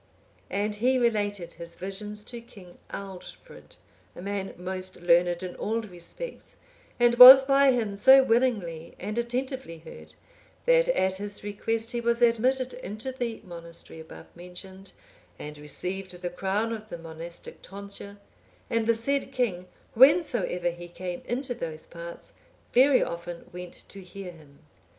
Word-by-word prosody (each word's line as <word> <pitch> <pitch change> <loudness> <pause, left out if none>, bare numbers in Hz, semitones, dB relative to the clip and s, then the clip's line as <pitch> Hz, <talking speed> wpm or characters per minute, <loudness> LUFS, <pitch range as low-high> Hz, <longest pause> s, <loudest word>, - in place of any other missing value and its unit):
And 210 +1 -2
he 255 +4 +2
related 205 -7 0
his 170 0 -10
visions 210 +2 -4
to 235 +1 -9
King 195 -6 -16
Aldfrid,(845) 195 - -10 0.4
a - - -9
man 200 -1 -4
most 185 +1 -5
learned 175 +1 +3
in 180 -1 -6
all 225 +2 -1
respects, 215 - -8 0.4
and 240 0 +5
was 260 +2 +13
by 275 0 +5
him 220 -5 -1
so 265 +6 +7
willingly 215 -10 0
and 210 +3 -4
attentively 250 -5 -3
heard, 160 - -13 0.5
that - - +4
at 190 - +1
his 205 +1 -6
request 225 +3 -2
he 240 -2 -2
was 235 +1 +1
admitted 255 +3 +2
into 230 +1 -6
the 240 -3 -4
monastery 170 -2 -10
above 160 - -13
mentioned, 185 +2 -11 0.5
and 150 0 -8
received 180 +5 -5
the 175 - -2
crown 200 +5 -1
of 215 -1 -8
the 170 - -6
monastic 165 +1 -9
tonsure; 200 +1 -8 0.5
and 230 -1 +1
the 230 - +4
said 275 +5 -1
king, 185 -8 -1 0.3
whensoever 245 - +4
he 175 0 -10
came 175 0 -6
into 250 +2 -3
those 160 -9 -6
parts, 170 0 -9 0.4
very 260 +2 +5
often 170 0 -6
went 180 0 -9
to 200 - -10
hear 185 0 -9
him. 150 -4 -18
200 Hz, 145 wpm, -27 LUFS, 175-240 Hz, 0.5 s, was